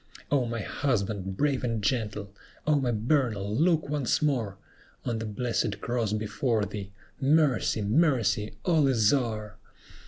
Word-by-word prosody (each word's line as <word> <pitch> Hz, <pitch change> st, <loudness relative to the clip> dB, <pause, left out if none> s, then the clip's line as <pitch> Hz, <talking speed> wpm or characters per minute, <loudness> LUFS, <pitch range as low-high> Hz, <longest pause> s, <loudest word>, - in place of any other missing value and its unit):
O 135 Hz, -4 st, +2 dB
my 115 Hz, -1 st, -3 dB
husband, 100 Hz, -6 st, -2 dB
brave 140 Hz, -1 st, +1 dB
and 115 Hz, -4 st, -1 dB
gentle! 105 Hz, -3 st, -1 dB, 0.3 s
O 155 Hz, -, +3 dB
my 135 Hz, -4 st, +2 dB
Bernal, 110 Hz, -3 st, 0 dB
look 160 Hz, +2 st, +2 dB
once 145 Hz, -4 st, 0 dB
more 120 Hz, -10 st, 0 dB, 0.5 s
On 115 Hz, -2 st, -1 dB
the 110 Hz, -, -4 dB
blessed 110 Hz, -1 st, -1 dB
cross 120 Hz, -3 st, -1 dB
before 110 Hz, +1 st, 0 dB
thee! 100 Hz, 0 st, -6 dB, 0.3 s
Mercy! 140 Hz, -6 st, +2 dB
mercy! 110 Hz, -, +2 dB
all 160 Hz, -5 st, +4 dB
is 115 Hz, -4 st, +4 dB
o'er!" 110 Hz, -6 st, -2 dB
115 Hz, 135 wpm, -28 LUFS, 105-140 Hz, 0.5 s, all